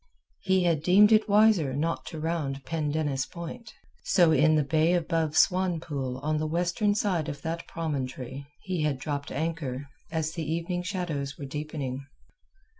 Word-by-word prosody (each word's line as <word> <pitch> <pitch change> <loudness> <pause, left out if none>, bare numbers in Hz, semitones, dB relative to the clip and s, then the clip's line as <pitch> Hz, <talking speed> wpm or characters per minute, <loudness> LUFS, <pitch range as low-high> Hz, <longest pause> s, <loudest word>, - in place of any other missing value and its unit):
He 190 -1 +2
had 165 -4 +2
deemed 195 +6 +6
it 215 0 +4
wiser 205 -10 +4
not 165 +4 -2
to 160 - -6
round 150 -4 -2
Pendennis 150 -4 -1
Point. 215 +7 -8 0.3
So 175 -4 +4
in 155 +1 +4
the 150 - +3
bay 160 +4 +2
above 165 -2 0
Swanpool 160 -8 +1
on 155 +1 0
the 155 - -1
western 175 +6 +1
side 180 -7 0
of 145 -1 -7
that 165 +1 -4
promontory 140 -4 -4 0.2
he 185 -4 -2
had 150 -3 0
dropped 140 +1 -4
anchor 145 -4 -3 0.2
as 160 -1 -1
the 160 -2 -4
evening 170 +2 -2
shadows 170 -7 -3
were 140 - -6
deepening. 140 -2 -5
160 Hz, 155 wpm, -28 LUFS, 145-175 Hz, 0.3 s, deemed